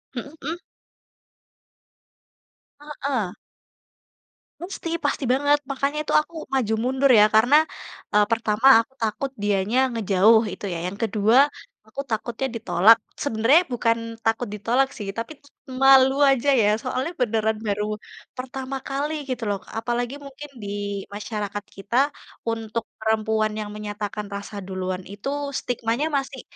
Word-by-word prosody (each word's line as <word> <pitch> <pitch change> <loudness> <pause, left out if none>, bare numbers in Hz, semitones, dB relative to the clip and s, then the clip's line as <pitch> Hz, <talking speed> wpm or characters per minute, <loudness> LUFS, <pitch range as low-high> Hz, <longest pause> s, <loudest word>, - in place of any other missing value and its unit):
Mhm 245 +4 -5
mhm. 330 +4 -4 2.2
Heeh. 275 -9 -3 1.3
Pasti 350 -2 -6 0.2
pasti 280 - 0
banget. 290 +2 +3
Makanya 275 +2 -1
itu - - -2
aku 335 - -16 0.2
maju 230 -5 +1
mundur 265 +2 +2
ya, 210 - +8
karena, 245 +7 +5 0.6
eee, 210 0 +5
pertama 225 +2 +2
aku 230 +3 -4
takut 225 +5 -2
dianya 205 +3 +1
ngejauh 220 0 +4
itu 190 - -11
ya, 170 - -3
yang 200 - -6
kedua, 220 +2 +3 0.5
aku 275 +6 -5
takutnya 230 +4 -2
ditolak, 225 0 +5 0.3
sebenernya 265 +5 +4
bukan 230 -1 +2 0.3
takut 225 +2 +1
ditolak 240 +6 +1
sih, 205 -3 -6
tapi 275 +6 -5 0.4
malu 265 0 +7 0.2
aja 270 +2 +1
ya, 205 - +3 0.2
soalnya 255 +5 -2
beneran 220 -2 +1
baru 205 +1 0 0.5
pertama 265 +1 -5
kali 285 +3 -2 0.2
gitu 250 -2 -3
loh. 200 -1 -1 0.2
Apalagi 240 +3 -2
mungkin 280 +2 -10
di 200 - -5 0.5
masyarakat 205 -1 -4
kita, 200 +5 -3 0.5
untuk 225 0 -3 0.2
perempuan 220 0 +1
yang 210 -1 -4
menyatakan 210 0 -5
rasa 200 +1 -7
duluan 185 -1 -3
itu 205 +6 -5 0.3
stigmanya 240 +3 -1
masih 270 -1 -4
230 Hz, 125 wpm, -24 LUFS, 210-270 Hz, 2.2 s, ya